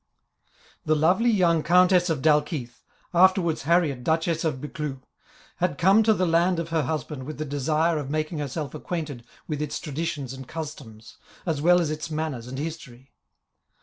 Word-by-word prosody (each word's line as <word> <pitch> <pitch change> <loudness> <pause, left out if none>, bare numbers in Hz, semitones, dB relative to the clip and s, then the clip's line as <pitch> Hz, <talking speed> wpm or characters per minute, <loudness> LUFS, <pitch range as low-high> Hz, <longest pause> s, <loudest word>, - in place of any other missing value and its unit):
The 155 - +2
lovely 180 +10 +3
young 175 -7 +3
Countess 180 +2 +4
of 150 -5 -1
Dalkeith, 150 -5 +1 0.3
afterwards 180 -2 +4
Harriet 160 -7 +2
Duchess 165 +1 0
of 155 -5 -1
Buccleuch, 145 -2 -5 0.5
had 175 -5 0
come 195 +7 +5
to 220 0 +4
the 185 - +1
land 170 +2 +2
of 165 0 -3
her 165 -1 +1
husband 150 0 -3
with 155 - -6
the 155 - -3
desire 155 +3 0
of 140 -2 -5
making 155 +1 -2
herself 145 +1 -4
acquainted 155 -5 -5 0.2
with 150 -2 -3
its 150 -1 -3
traditions 150 -3 -4
and 130 -1 -9
customs, 135 -9 -8 0.3
as 160 -5 -1
well 175 +3 +5
as 160 -3 0
its 155 +1 -4
manners 155 -6 -3
and 130 +1 -6
history. 140 -4 -7
155 Hz, 165 wpm, -25 LUFS, 145-170 Hz, 0.5 s, come